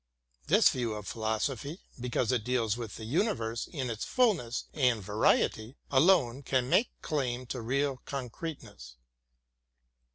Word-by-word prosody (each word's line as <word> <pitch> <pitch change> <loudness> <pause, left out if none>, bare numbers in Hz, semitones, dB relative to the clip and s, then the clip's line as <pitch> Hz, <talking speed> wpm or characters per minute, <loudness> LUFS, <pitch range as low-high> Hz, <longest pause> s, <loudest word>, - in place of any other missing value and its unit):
This - - +6
view 120 -3 -1
of 105 -1 -7
philosophy, 120 - -2 0.2
because 120 -1 0
it 125 -4 +1
deals 115 -3 +1
with 115 -4 -6
the 110 - -7
universe 120 - -1
in 130 -7 -3
its 110 -1 -4
fulness 180 - +1
and 125 -6 +2
variety, 110 +4 +1
alone 140 -3 +4
can 130 -2 0
make 230 - +4
claim 130 -4 -1
to 125 - -5
real 135 +3 0
con 130 -4 -4
creteness. 110 - -8
125 Hz, 135 wpm, -30 LUFS, 115-140 Hz, 0.2 s, This